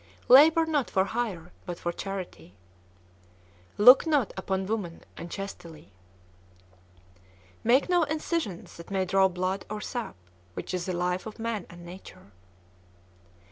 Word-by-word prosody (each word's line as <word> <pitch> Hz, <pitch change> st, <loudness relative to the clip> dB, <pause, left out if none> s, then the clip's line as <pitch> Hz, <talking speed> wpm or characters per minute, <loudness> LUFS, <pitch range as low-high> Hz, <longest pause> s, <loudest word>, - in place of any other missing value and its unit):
Labor 315 Hz, +5 st, +8 dB
not 300 Hz, -5 st, 0 dB
for 190 Hz, -, +2 dB
hire, 195 Hz, -6 st, -4 dB, 0.2 s
but 175 Hz, -1 st, -4 dB
for 175 Hz, -, -3 dB
charity. 185 Hz, -, -7 dB, 1.2 s
Look 250 Hz, +9 st, +8 dB
not 290 Hz, -8 st, +1 dB
upon 190 Hz, 0 st, -2 dB
women 195 Hz, -5 st, -4 dB
unchastely. 170 Hz, -, -8 dB, 1.7 s
Make 250 Hz, +5 st, +4 dB
no 355 Hz, -1 st, +3 dB
incisions 310 Hz, -, -3 dB
that 170 Hz, -, -11 dB
may 190 Hz, -1 st, 0 dB
draw 190 Hz, +1 st, +4 dB
blood 185 Hz, +1 st, -2 dB
or 210 Hz, 0 st, -4 dB
sap, 240 Hz, -, -5 dB, 0.4 s
which -, -, -6 dB
is 180 Hz, 0 st, -3 dB
the 185 Hz, -, -1 dB
life 180 Hz, +3 st, -1 dB
of 215 Hz, -, -9 dB
man 225 Hz, -4 st, -3 dB
and 175 Hz, 0 st, -12 dB
nature. 175 Hz, -, -12 dB
195 Hz, 130 wpm, -27 LUFS, 180-240 Hz, 1.7 s, Labor